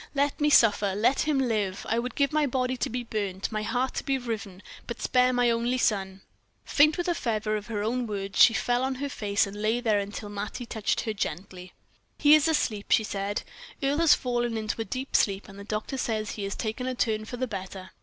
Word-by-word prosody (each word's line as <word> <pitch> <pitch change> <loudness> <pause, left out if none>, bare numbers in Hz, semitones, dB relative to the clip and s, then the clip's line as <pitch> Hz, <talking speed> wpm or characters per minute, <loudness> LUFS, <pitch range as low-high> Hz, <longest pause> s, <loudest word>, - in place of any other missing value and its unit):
let 280 +1 0
me 295 - +4
suffer, 205 -7 +4
let 230 +6 +2
him 300 -2 +2
live! 215 -7 -1
I 225 - +1
would 245 0 -4
give 280 +1 +1
my 305 -1 +2
body 255 0 0
to 245 - -2
be 245 +1 -3
burned, 200 -4 -3
my 215 -1 -2
heart 245 +5 -1
to - - -3
be 270 -1 0
riven 210 -6 -6 0.2
but 235 - -5
spare 250 0 +3
my 245 -1 +3
only 235 +2 0
son!" 195 -5 0 0.4
Faint 305 +1 +4
with 350 - -1
the 350 - +1
fervor 215 -7 -1
of 210 -1 -5
her 210 -3 -3
own 240 +2 -1
words, 195 -2 -1
she - - +9
fell 245 +1 +1
on 265 0 -1
her 280 +2 -4
face, 205 -5 0
and 200 +1 -8
there 220 +3 +2 0.2
lay - - -5
till 205 0 -7
Mattie 205 +4 -5
touched 220 -3 -1
her 220 - -3
gently. 180 -1 -5 0.4
"He 295 0 +6
is 310 0 +6
asleep," 220 -10 0
she 220 - +4
said; 200 0 -3 0.4
"Earle 280 +3 +1
has 335 -2 +6
fallen 240 -2 -1
into 220 +1 -3
a - - -3
deep 260 +3 -4
sleep, 195 -1 +2
and 195 -1 -12
the - - -8
doctor 215 +6 -4
says 215 -3 -2
he 205 - -4
has 200 - -4
taken 225 +3 -3
a 255 - -2
turn 215 -2 0
for 245 - -7
the 255 - -1
better." 190 -3 -7
225 Hz, 230 wpm, -27 LUFS, 205-255 Hz, 0.4 s, she